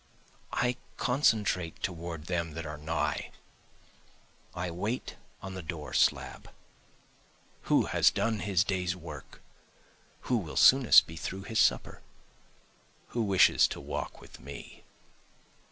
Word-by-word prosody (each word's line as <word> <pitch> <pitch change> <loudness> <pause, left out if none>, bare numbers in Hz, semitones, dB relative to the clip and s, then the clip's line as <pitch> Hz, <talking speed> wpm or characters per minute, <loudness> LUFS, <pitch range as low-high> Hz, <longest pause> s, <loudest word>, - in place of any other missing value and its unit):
I 125 0 0 0.2
concentrate 105 - +1
toward 85 -3 -4
them 85 -2 -2
that 80 -1 -5
are 75 0 -5
nigh, 75 0 -2 1.3
I 90 0 -3
wait 105 +9 -4 0.3
on 95 0 -6
the 95 - -6
door 80 -2 -7
slab. - - +1 1.2
Who - - +4
has - - +4
done 110 +1 -1
his 95 -4 +1
day's 90 -2 -1
work? 75 -6 -11 0.8
who 125 - 0
will 85 -8 -5
soonest 130 -3 +7
be 80 - -10
through 95 +4 -5
with 95 - -11
his 115 - 0
supper? - - +1 1.1
Who 120 - -2
wishes 100 -4 +5
to - - -6
walk - - -5
with - - -14
me? 70 +2 -11
90 Hz, 125 wpm, -30 LUFS, 80-105 Hz, 1.3 s, soonest